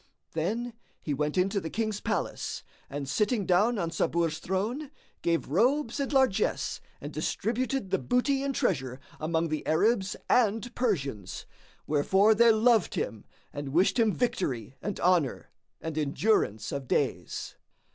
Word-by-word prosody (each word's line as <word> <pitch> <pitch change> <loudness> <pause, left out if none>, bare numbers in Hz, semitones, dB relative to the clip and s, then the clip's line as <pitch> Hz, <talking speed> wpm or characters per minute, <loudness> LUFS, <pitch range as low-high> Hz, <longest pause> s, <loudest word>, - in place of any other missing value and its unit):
Then 225 +9 -2 0.3
he 150 - -3
went 150 +4 -1
into 195 +2 +2
the 160 - -4
King's 215 0 -2
palace 215 -5 -2 0.3
and 140 0 -4
sitting 210 - +1
down 205 +7 +3
on 170 -4 -1
Sabur's 165 -1 0
throne, 225 - -2 0.3
gave 170 -4 0
robes 240 - +2
and 280 0 -1
largesse 265 -8 +1 0.2
and - - -7
distributed 245 -2 -1
the 190 - +2
booty 270 +2 +1
and 275 -1 -2
treasure 130 - 0 0.2
among 160 +1 0
the 155 0 -2
Arabs 195 +4 +2
and 225 0 +2
Persians, 140 - -2 0.4
wherefore 190 +9 +4
they 235 +2 +6
loved 220 -2 +3
him 110 -3 -3 0.3
and 145 -2 -5
wished 185 - +3
him 225 -2 +4
victory 135 - -2
and 205 -2 -4
honour 175 -7 +1 0.3
and 160 -1 -5
endurance 150 - +1
of 140 -2 -4
days. - - -1
190 Hz, 140 wpm, -29 LUFS, 155-235 Hz, 0.4 s, they